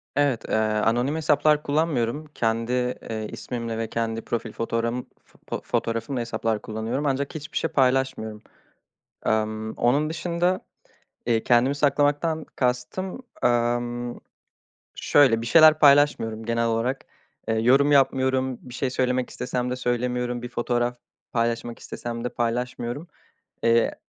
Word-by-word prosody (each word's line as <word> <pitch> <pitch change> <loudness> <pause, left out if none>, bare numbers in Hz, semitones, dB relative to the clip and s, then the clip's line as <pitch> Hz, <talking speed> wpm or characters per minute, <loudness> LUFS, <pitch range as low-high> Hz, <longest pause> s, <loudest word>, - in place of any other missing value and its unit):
Evet, 140 -5 +1
ııı, 110 -1 +1
anonim 120 +6 +1
hesaplar 150 -1 +3
kullanmıyorum. 145 -2 0
Kendi, 115 +1 0 0.4
eee, 110 -1 -3
ismimle 115 -2 -5
ve 115 0 -2
kendi 115 0 -2
profil 115 -1 -3
fotoğrağım 115 +2 -2 0.4
fo - - -4
fotoğrafımla 115 +3 -2
hesaplar 115 -2 -2
kullanıyorum 110 +6 -3
ancak 140 +1 -1
hiçbir 150 -1 -5
şey 165 - 0
paylaşmıyorum. 130 -6 +1 0.9
Emm, 110 0 0
onun 145 +6 +1
dışında, 175 +2 0 0.7
eee, 115 -2 +2
kendimi 125 +3 +3
saklamaktan 145 +2 +1
kastım, 125 - -2 0.2
ımm, 120 0 0 0.8
şöyle: 130 -6 +4
Bir 115 - -4
şeyler 155 0 +7
paylaşmıyorum 140 -7 +4
genel 115 0 0
olarak. 115 +4 -1 0.4
Iıı, 110 0 +1
yorum 135 +4 +5
yapmıyorum, 130 -2 +2
bir 125 - -12
şey 130 +1 -1
söylemek 125 0 0
istesem 125 0 -3
de - - -1
söylemiyorum, 125 0 -1
bir 120 - -6
fotoğraf 120 0 -1 0.3
paylaşmak 115 0 -1
istesem 115 0 -6
de 125 - -1
paylaşmıyorum. 120 +5 -3 0.6
Eee, 115 0 +3
125 Hz, 125 wpm, -25 LUFS, 115-140 Hz, 0.9 s, şeyler